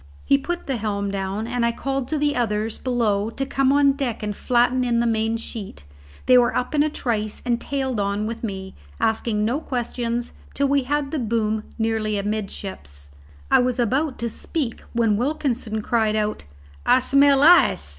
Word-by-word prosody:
He 275 - +5
put 345 +5 -3
the 265 -3 -1
helm 200 -2 -2
down, 195 +2 -3
and 240 0 -1
I 235 - +3
called 270 +1 -3
to 310 - -1
the 290 0 +1
others 220 -2 -1
below 225 -5 0
to 270 +4 -3
come 270 0 +1
on 285 0 +5
deck 270 -6 -3
and 210 -1 -3
flatten 250 +2 +2
in 240 -1 +1
the 235 - +2
main 225 0 +1
sheet. 210 - -7 0.4
They 255 -1 +7
were 240 - +2
up 250 - -2
in 295 - +3
a 305 - +2
trice 215 -7 -2
and 240 -1 0
tailed 265 -4 -2
on 200 +1 -1
with 230 +2 -5
me, 190 -3 -5 0.3
asking 220 -1 0
no 245 +6 0
questions, 240 -3 -3 0.2
till 280 - +2
we 280 -2 +2
had 290 +1 -1
the 310 - -1
boom 220 -2 -1
nearly 220 -2 0
amidships. 195 - -5 0.4
I - - +7
was 250 0 +1
about 260 +4 0
to 235 - -2
speak 275 -4 -3
when 225 -3 +2
Wilkinson 245 -4 -1
cried 220 -2 +1
out, 210 - -2 0.4
"I - - +5
smell 275 +1 +4
ice." 315 - +5
235 Hz, 185 wpm, -23 LUFS, 215-270 Hz, 0.4 s, They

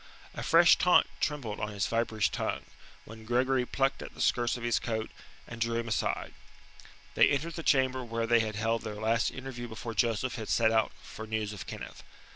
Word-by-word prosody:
A - - -6
fresh 170 +1 +6
taunt 180 0 +5
trembled 130 -9 -2
on 105 - -2
his 100 - 0
viperish 110 -7 0
tongue, - - -3 0.4
when 110 0 -11
Gregory 125 +2 +1
plucked 135 0 0
at - - -9
the - - -14
skirts 120 0 +1
of 120 - -8
his 120 -1 +1
coat, 110 -1 -3 0.4
and 120 -1 -9
drew 115 0 +1
him 115 - -4
aside. 110 - -1 0.8
They - - +6
entered 150 +4 -1
the 165 - -5
chamber 130 -4 +2
where 115 -1 -2
they 120 +1 +4
had 110 -1 -2
held 115 +1 0
their 110 -1 -6
last 110 +2 +1
interview 130 -2 -7
before 115 +1 -6
Joseph 120 +2 0
had 110 -2 -6
set 110 -1 +3
out 110 -1 +2
for 110 - -9
news 110 -1 -2
of 95 -3 -8
Kenneth. - - -8
115 Hz, 200 wpm, -30 LUFS, 110-130 Hz, 0.8 s, fresh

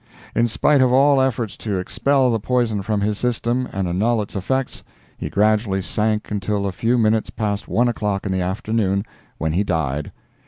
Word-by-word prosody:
In 115 +1 +3
spite 140 +5 +3
of 130 -1 +4
all 135 +1 +5
efforts 120 -5 -1
to 105 -3 -3
expel 130 +7 +1
the 115 - 0
poison 115 -2 0
from 105 +1 -1
his 105 0 -1
system 125 +1 -1
and 95 -1 -2
annul 105 +6 +1
its 100 - -11
effects, 130 +8 -2 0.3
he - - -5
gradually 105 -2 +1
sank 105 +3 -1
until 100 0 -1
a 100 - -1
few 115 +6 +1
minutes 110 -1 +2
past 105 -2 -3
one 120 +2 +2
o'clock 105 -4 -1
in 100 - -1
the 95 0 0
afternoon, 100 +1 -1 0.3
when 80 -1 -1
he 95 +5 +2
died. 75 -6 -2
105 Hz, 185 wpm, -21 LUFS, 100-120 Hz, 0.3 s, all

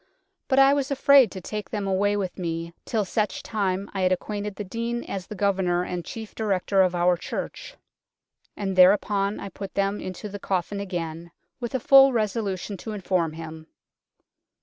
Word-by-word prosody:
But 265 - +1
I 270 0 +7
was 280 -1 0
afraid 275 -3 +6
to 190 - -6
take 210 +3 -5
them 205 -2 -3
away 200 +2 +1
with 190 -2 -4
me 165 -1 -3
till 215 -3 0
such 210 +3 -1
time 200 -2 -1
I 195 - -2
had 185 0 +3
acquainted 205 +2 -3
the 210 - -5
Dean 230 +4 -3
as 190 -2 -6
the 210 - -7
governour 190 -3 +1
and 180 -1 -4
chief 220 +3 -8
Director 195 -2 +1
of 180 -1 +2
our 175 +1 +3
church; - - -6 0.8
And 195 -2 -2
thereupon 200 +2 +4
I 200 - -6
put 195 0 -8
them 200 +1 0
into 185 +3 -6
the 205 0 -7
coffin 195 +1 -2
again, 170 -4 -5 0.3
with 240 +1 -4
a - - +1
full 270 +2 +7
resolution 205 -3 -2
to 220 +4 -6
inform 185 -5 -1
him." 160 0 -9
200 Hz, 175 wpm, -25 LUFS, 185-215 Hz, 0.8 s, I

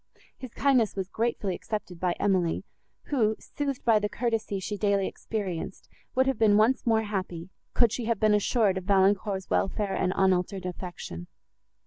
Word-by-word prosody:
His 255 -4 -9
kindness 255 -7 +3
was 190 -1 -3
gratefully 220 -4 -1
accepted 185 -3 -5
by 180 -1 +1
Emily, 185 -4 0 0.5
who, 220 -6 +2
soothed 280 -3 -4
by 225 -3 +5
the 210 0 -2
courtesy 225 -4 -1
she 205 +2 -4
daily 200 -1 +1
experienced, 190 -4 -5 0.3
would 260 +1 +4
have 270 0 0
been 210 -2 +5
once 235 +4 +3
more 220 -1 +3
happy, 185 -4 -4 0.2
could 235 -3 +4
she 235 +1 -3
have 230 -3 0
been 215 -1 +4
assured 210 -2 +2
of 185 - -13
Valancourt's 195 0 +2
welfare 200 0 0
and 185 - 0
unaltered 190 0 +1
affection. 175 - -6
205 Hz, 160 wpm, -27 LUFS, 190-225 Hz, 0.5 s, by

